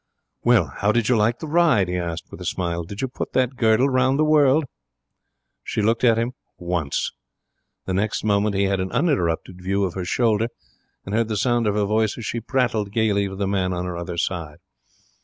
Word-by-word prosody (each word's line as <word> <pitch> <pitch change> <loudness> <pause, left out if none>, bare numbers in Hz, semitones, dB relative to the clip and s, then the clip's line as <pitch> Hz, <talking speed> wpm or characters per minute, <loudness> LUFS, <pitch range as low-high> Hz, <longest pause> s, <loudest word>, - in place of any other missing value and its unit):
'Well, - - +3
how 100 +1 +2
did 115 0 +1
you 125 - +4
like 110 +2 +2
the 160 - -7
ride?' 155 - +3
he 90 - -2
asked, 85 -2 -4
with - - -10
a - - -6
smile. 85 -1 -2
'Did 100 +4 -7
you - - +1
put 125 - -6
that 130 0 +1
girdle 115 +2 +3
round 130 0 +2
the 155 - +3
world?' 150 -1 +4 1.0
She 105 - -2
looked 115 +3 +1
at 115 -2 +5
him 115 +2 0 0.3
once. 85 -5 -2 0.7
The 95 - -2
next 105 +3 -1
moment 105 -1 +1
he 100 - +2
had 95 -1 +1
an 95 0 -3
uninterrupted 90 - 0
view 100 +2 0
of 90 -3 -1
her 95 - -4
shoulder, 115 +2 +1 0.6
and 100 - -6
heard 115 0 +2
the 110 -2 -2
sound 120 0 +1
of 105 - +1
her 105 -1 +1
voice 110 +1 +1
as 115 - -6
she 115 - -2
prattled 115 -4 -1
gaily 105 -2 +1
to 95 - -7
the 100 0 -2
man 95 -2 0
on 90 0 -3
her 90 -1 -4
other 85 0 -5
side. 85 -4 -3
105 Hz, 215 wpm, -23 LUFS, 95-120 Hz, 1.0 s, at